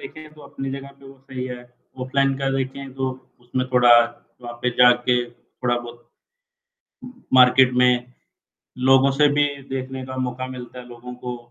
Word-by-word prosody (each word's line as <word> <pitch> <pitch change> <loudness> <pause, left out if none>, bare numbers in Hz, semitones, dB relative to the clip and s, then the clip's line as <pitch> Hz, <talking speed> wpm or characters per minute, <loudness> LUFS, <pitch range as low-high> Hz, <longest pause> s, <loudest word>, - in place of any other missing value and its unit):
देखें 155 -1 -11
तो 155 - -17
अपनी 135 -1 -7
जगह 135 0 -7
पे 135 - -16
वो 135 0 -14
सही 130 -1 -5
है, 125 -1 -7 0.4
ऑफलाइन 135 +1 +1
का 135 -1 -1
देखें 135 0 -5
तो 135 0 -2 0.3
उसमें 125 +1 -3
थोड़ा 125 -1 +5 0.5
वहाँ 120 0 -7
पे 125 - +1
जा 125 0 +8 0.2
के 125 -1 +3
थोड़ा 120 0 -4
बहुत, 120 0 -12 1.3
मार्केट 125 0 +6
में, 125 0 +2 0.7
लोगों 135 +1 +4
से 145 +2 +3
भी 145 0 +3 0.2
देखने 130 0 -5
का 130 - -7
मौका 125 +1 -5
मिलता 125 -1 -9
है 125 - -10
लोगों 120 +1 -10
को 125 0 -4
130 Hz, 165 wpm, -22 LUFS, 125-135 Hz, 1.3 s, जा